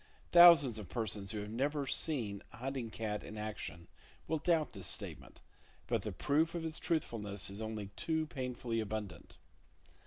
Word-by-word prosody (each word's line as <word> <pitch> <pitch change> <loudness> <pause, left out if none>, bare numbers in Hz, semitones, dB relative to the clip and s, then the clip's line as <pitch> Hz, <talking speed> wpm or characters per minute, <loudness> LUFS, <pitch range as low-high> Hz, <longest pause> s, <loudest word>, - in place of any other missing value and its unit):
Thousands 165 -10 +8
of 105 - -8
persons 105 -4 -2
who 105 -1 -4
never 140 +7 0
have 135 - -2
seen 115 -11 0
a - - -12
hunting 130 -1 -3
cat 105 -1 -3
in 110 - -8
action 105 -5 -5 0.4
will 160 0 0
doubt 160 -1 +2
this - - -6
statement, - - -5 0.4
but - - 0
the - - -4
proof 160 +4 +1
of 165 -1 -3
its 160 0 -4
truthfulness 105 - -1
is 100 +3 -5
only 110 -2 -4
too 160 -1 0
painfully 125 -4 -3
abundant. 105 -5 -5
115 Hz, 160 wpm, -35 LUFS, 105-150 Hz, 0.4 s, Thousands